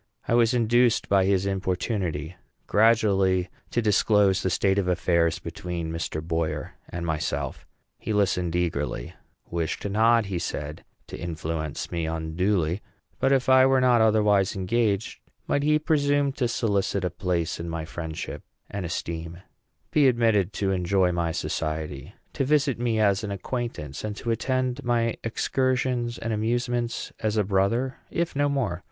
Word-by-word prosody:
I -, -, +1 dB
was 120 Hz, 0 st, +4 dB
induced 120 Hz, 0 st, +3 dB
by 95 Hz, -1 st, +4 dB
his 95 Hz, 0 st, +2 dB
importunity 95 Hz, -4 st, -2 dB, 0.3 s
gradually 100 Hz, -4 st, +3 dB, 0.2 s
to 120 Hz, -, 0 dB
disclose 105 Hz, -2 st, +3 dB
the 95 Hz, -, 0 dB
state 95 Hz, +2 st, +2 dB
of 95 Hz, -, -1 dB
affairs 85 Hz, -2 st, +2 dB
between 85 Hz, -2 st, -5 dB
Mr. 80 Hz, -1 st, -3 dB
Boyer 80 Hz, -1 st, -2 dB, 0.2 s
and 85 Hz, 0 st, -4 dB
myself. 75 Hz, -4 st, -3 dB, 0.3 s
He -, -, -4 dB
listened 90 Hz, -5 st, +1 dB
eagerly; 75 Hz, -8 st, -2 dB, 0.4 s
wished 85 Hz, +3 st, -2 dB
not, 115 Hz, +2 st, +3 dB
he 95 Hz, -3 st, -3 dB
said, 75 Hz, -2 st, -5 dB, 0.2 s
to -, -, -9 dB
influence 80 Hz, -3 st, -4 dB
me 85 Hz, -2 st, -2 dB
unduly; 80 Hz, +3 st, 0 dB, 0.4 s
but 135 Hz, -, +2 dB
if 135 Hz, -2 st, +2 dB
I 130 Hz, 0 st, +7 dB
were 135 Hz, 0 st, +4 dB
not 125 Hz, -2 st, +4 dB
otherwise 105 Hz, -2 st, +3 dB
engaged, 105 Hz, +1 st, 0 dB, 0.3 s
might 140 Hz, -, +1 dB
he 150 Hz, +1 st, +3 dB
presume 145 Hz, -2 st, +2 dB
to 130 Hz, -2 st, -1 dB
solicit 100 Hz, -5 st, 0 dB
a 90 Hz, -, -1 dB
place 85 Hz, -3 st, -2 dB
in 85 Hz, 0 st, -4 dB
my 80 Hz, -1 st, -4 dB
friendship 80 Hz, -1 st, -6 dB, 0.3 s
and 100 Hz, -3 st, -3 dB
esteem, 85 Hz, 0 st, -5 dB, 0.5 s
be 145 Hz, -3 st, +5 dB
admitted 115 Hz, -6 st, +3 dB
to 95 Hz, -1 st, 0 dB
enjoy 90 Hz, 0 st, +2 dB
my 85 Hz, -1 st, -1 dB
society, 75 Hz, -4 st, -4 dB, 0.2 s
to -, -, 0 dB
visit 140 Hz, -3 st, +2 dB
me 115 Hz, -2 st, 0 dB
as 100 Hz, -1 st, +3 dB
an 105 Hz, -, -3 dB
acquaintance, 100 Hz, -, -4 dB
and 105 Hz, -1 st, -3 dB
to 115 Hz, -, -3 dB
attend 130 Hz, +3 st, -1 dB
my 115 Hz, -1 st, +1 dB
excursions 125 Hz, 0 st, 0 dB
and 115 Hz, 0 st, -3 dB
amusements 120 Hz, +2 st, -1 dB
as 110 Hz, -1 st, -1 dB
a 105 Hz, -, +3 dB
brother, 105 Hz, +7 st, +1 dB
if 170 Hz, -2 st, -2 dB
not 145 Hz, +1 st, +2 dB
more? 120 Hz, -11 st, -1 dB
100 Hz, 150 wpm, -26 LUFS, 85-120 Hz, 0.5 s, I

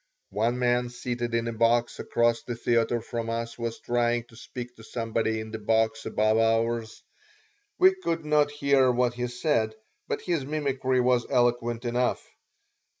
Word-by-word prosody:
One 115 Hz, +5 st, 0 dB
man, 125 Hz, 0 st, +1 dB
seated 120 Hz, -1 st, -3 dB
in 115 Hz, 0 st, 0 dB
a 115 Hz, -, -2 dB
box 115 Hz, +1 st, +2 dB
across 120 Hz, 0 st, +1 dB
the 120 Hz, -, -5 dB
theater 115 Hz, 0 st, +1 dB
from 115 Hz, 0 st, -4 dB
us, 115 Hz, 0 st, -3 dB
was 115 Hz, -1 st, -3 dB
trying 120 Hz, 0 st, 0 dB
to 115 Hz, -, -17 dB
speak 120 Hz, +1 st, -8 dB
to 110 Hz, -, -13 dB
somebody 115 Hz, -1 st, -1 dB
in 110 Hz, 0 st, -7 dB
the 110 Hz, -, -5 dB
box 110 Hz, +1 st, +1 dB
above 110 Hz, +1 st, +2 dB
ours. 115 Hz, 0 st, 0 dB, 0.7 s
We 375 Hz, +1 st, +6 dB
could 165 Hz, -, -3 dB
not 150 Hz, -1 st, +3 dB
hear 140 Hz, -3 st, +3 dB
what 125 Hz, 0 st, +1 dB
he 125 Hz, 0 st, -2 dB
said, 120 Hz, -3 st, 0 dB, 0.3 s
but -, -, -2 dB
his 170 Hz, -6 st, -1 dB
mimicry 135 Hz, -3 st, 0 dB
was 125 Hz, -1 st, +2 dB
eloquent 120 Hz, -1 st, +1 dB
enough. 120 Hz, +1 st, 0 dB
120 Hz, 160 wpm, -27 LUFS, 115-125 Hz, 0.7 s, We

